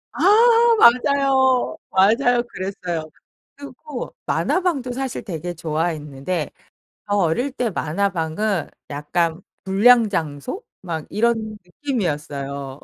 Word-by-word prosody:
아 -, -, -4 dB, 0.6 s
맞아요. 265 Hz, -, +4 dB
맞아요. 230 Hz, +5 st, +3 dB
그랬어요. 180 Hz, -4 st, -5 dB, 0.5 s
그리고 285 Hz, -1 st, -8 dB
만화방도 335 Hz, -9 st, 0 dB
사실 265 Hz, 0 st, -4 dB
되게 175 Hz, -2 st, -5 dB
좋아했는데 155 Hz, -1 st, -3 dB, 0.6 s
저 205 Hz, -, +2 dB
어릴 200 Hz, -, +1 dB
때 250 Hz, -4 st, -2 dB
만화방은 175 Hz, +2 st, -1 dB, 0.2 s
약간 160 Hz, +4 st, -1 dB, 0.2 s
불량 220 Hz, +5 st, +5 dB
장소 165 Hz, -, -3 dB, 0.2 s
막 165 Hz, -4 st, -5 dB
이런 220 Hz, -1 st, 0 dB
느낌이었어요. 145 Hz, -, -4 dB
195 Hz, 235 characters per minute, -21 LUFS, 160-245 Hz, 0.6 s, 불량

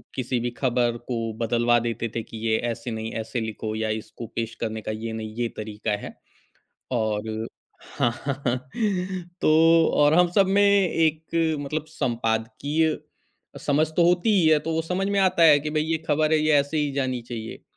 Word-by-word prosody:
किसी 125 Hz, -1 st, -1 dB
भी 120 Hz, -, -1 dB
ख़बर 120 Hz, -2 st, +1 dB
को 120 Hz, -2 st, -2 dB, 0.2 s
बदलवा 120 Hz, +1 st, +2 dB
देते 115 Hz, 0 st, -3 dB
थे 115 Hz, -, -2 dB
कि 110 Hz, -, -10 dB
ये 110 Hz, 0 st, +3 dB
ऐसे 115 Hz, +1 st, -6 dB
नहीं 110 Hz, 0 st, -4 dB
ऐसे 115 Hz, +2 st, -4 dB
लिखो 110 Hz, 0 st, -4 dB
या 110 Hz, 0 st, -1 dB
इसको 110 Hz, +1 st, -10 dB
पेश 115 Hz, 0 st, -3 dB
करने 110 Hz, -1 st, -3 dB
का 110 Hz, -, -4 dB
ये 110 Hz, +1 st, -5 dB
नहीं 110 Hz, -1 st, -6 dB
ये 120 Hz, 0 st, -1 dB
तरीक़ा 105 Hz, 0 st, -4 dB
है -, -, -8 dB, 0.8 s
और 110 Hz, -1 st, -1 dB, 0.5 s
हाँ, 120 Hz, -, +3 dB
हाँ, 140 Hz, -2 st, -1 dB
हाँ 125 Hz, +1 st, +2 dB, 0.8 s
तो -, -, +3 dB, 0.5 s
और 150 Hz, +1 st, +5 dB
हम 175 Hz, +1 st, +5 dB
सब 195 Hz, -1 st, +4 dB
में 200 Hz, +1 st, +3 dB
एक 165 Hz, -6 st, +2 dB, 0.3 s
मतलब 150 Hz, +2 st, -3 dB
संपादकीय 130 Hz, +4 st, -1 dB, 0.6 s
समझ 150 Hz, +2 st, +2 dB
तो 175 Hz, -, +5 dB
होती 180 Hz, +5 st, +2 dB
ही 160 Hz, -, +3 dB
है 155 Hz, -1 st, +5 dB
तो 165 Hz, -, -3 dB
वो 160 Hz, 0 st, 0 dB
समझ 185 Hz, +4 st, -2 dB
में 200 Hz, 0 st, +1 dB
आता 185 Hz, -3 st, +3 dB
है 150 Hz, -3 st, +8 dB
कि 150 Hz, +1 st, -4 dB
भई 155 Hz, 0 st, 0 dB
ये 160 Hz, 0 st, 0 dB
ख़बर 155 Hz, +1 st, +2 dB
है 155 Hz, -, +5 dB
ये 155 Hz, 0 st, +2 dB
ऐसे 145 Hz, +3 st, -2 dB
ही 150 Hz, -1 st, 0 dB
जानी 130 Hz, -3 st, -1 dB
चाहिए। 115 Hz, -2 st, -7 dB
125 Hz, 190 wpm, -24 LUFS, 115-155 Hz, 0.8 s, है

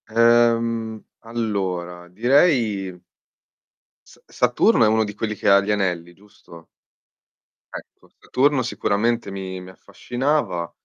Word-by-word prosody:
Ehm, 115 Hz, -1 st, +2 dB, 0.2 s
allora, 95 Hz, -7 st, -4 dB
direi 110 Hz, -, +1 dB, 1.1 s
Sa -, -, -19 dB
Saturno 125 Hz, -, +2 dB
è -, -, +5 dB
uno 110 Hz, +1 st, +2 dB
di 105 Hz, -1 st, -6 dB
quelli 110 Hz, 0 st, -4 dB
che -, -, -4 dB
ha 100 Hz, 0 st, +7 dB
gli 100 Hz, -, -6 dB
anelli, 90 Hz, -4 st, -2 dB
giusto? 85 Hz, -4 st, -17 dB, 1.1 s
Ecco, -, -, -12 dB
Saturno 135 Hz, 0 st, +1 dB
sicuramente 115 Hz, -1 st, -1 dB
mi 95 Hz, -1 st, -6 dB
mi 90 Hz, -, -11 dB
affascinava. 120 Hz, -, -3 dB
110 Hz, 110 wpm, -22 LUFS, 95-120 Hz, 1.1 s, ha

